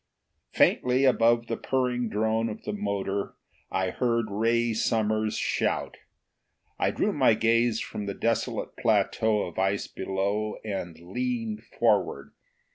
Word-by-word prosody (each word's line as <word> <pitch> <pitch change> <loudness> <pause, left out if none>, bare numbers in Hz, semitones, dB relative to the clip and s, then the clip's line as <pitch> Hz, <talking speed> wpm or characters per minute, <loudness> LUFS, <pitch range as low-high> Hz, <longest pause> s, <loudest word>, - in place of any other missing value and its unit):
Faintly, 125 +2 +3
above 120 -2 +4
the 115 - -2
purring 125 -2 -1
drone 110 +2 0
of 105 - -7
the - - -3
motor, 100 -1 -2 0.3
I 95 -1 -1
heard 115 -2 0
Ray 115 +2 +1
Summers' 110 -1 0
shout. - - -1 0.8
I - - +2
drew - - 0
my 110 - +4
gaze 115 0 +2
from 105 - -5
the 100 - -3
desolate 115 0 -1
plateau 110 -1 +2
of 85 - -6
ice 95 +1 +1
below 100 +3 -2
and 90 -6 -4
leaned 230 - -3
forward. - - 0
110 Hz, 125 wpm, -27 LUFS, 100-115 Hz, 0.8 s, above